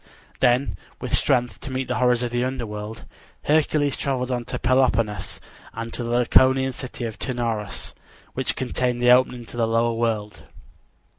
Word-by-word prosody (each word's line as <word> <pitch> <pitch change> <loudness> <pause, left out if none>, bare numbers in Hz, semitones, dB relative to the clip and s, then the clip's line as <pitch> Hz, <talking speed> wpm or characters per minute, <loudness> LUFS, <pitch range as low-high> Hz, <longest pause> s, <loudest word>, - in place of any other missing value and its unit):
Then, 125 -6 +2 0.2
with - - 0
strength 125 -2 +1
to - - -6
meet 130 0 -2
the 125 0 -1
horrors 125 -1 +3
of 120 - -2
the 120 0 0
underworld, 110 -4 -5 0.4
Hercules 150 -2 +2
traveled 130 -2 -2
on 120 -1 -2
to - - -4
Peloponnesus, 120 -6 +1 0.3
and 115 0 -6
to 120 - -3
the 115 - -4
Laconian 130 +2 +4
city 125 -1 -6
of 110 -2 -6
Taenarus, 115 -6 -3 0.4
which - - -2
contained 125 -1 -1
the 120 0 +5
opening 125 -1 +3
to 120 - -11
the 115 -1 +2
lower 115 +1 +2
world. 110 -2 -2
120 Hz, 160 wpm, -23 LUFS, 115-130 Hz, 0.4 s, the